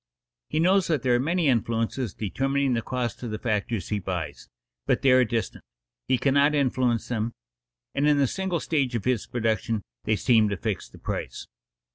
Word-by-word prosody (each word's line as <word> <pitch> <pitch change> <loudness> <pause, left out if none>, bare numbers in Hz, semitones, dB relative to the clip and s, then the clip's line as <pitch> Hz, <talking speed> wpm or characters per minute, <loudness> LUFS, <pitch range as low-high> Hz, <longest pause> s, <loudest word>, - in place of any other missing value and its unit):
He 155 - 0
knows 185 +2 +4
that 155 -7 0
there 125 -2 +3
are 120 - +3
many 165 +4 +1
influences 115 -1 0
determining 135 +5 0
the 115 - 0
cost 120 -2 -3
of 120 - -4
the 110 - -3
factors 105 -3 -2
he 105 - 0
buys, 80 -8 -5 0.4
but - - +1
they 135 - +6
are 130 0 +6
distant; 115 -1 -3 0.4
he 130 - +3
cannot 140 +3 +3
influence 130 -4 +1
them, 115 -1 -1 0.6
and 145 +1 +1
in 150 -1 +4
the 140 - +4
single 190 +4 -2
stage 140 -6 0
of 115 - -3
his 125 -3 0
production 110 -2 -1 0.2
they 110 - +2
seem 110 +1 +3
to 100 - -2
fix 110 -3 -3
the - - -15
price. - - -5
125 Hz, 185 wpm, -26 LUFS, 110-140 Hz, 0.6 s, they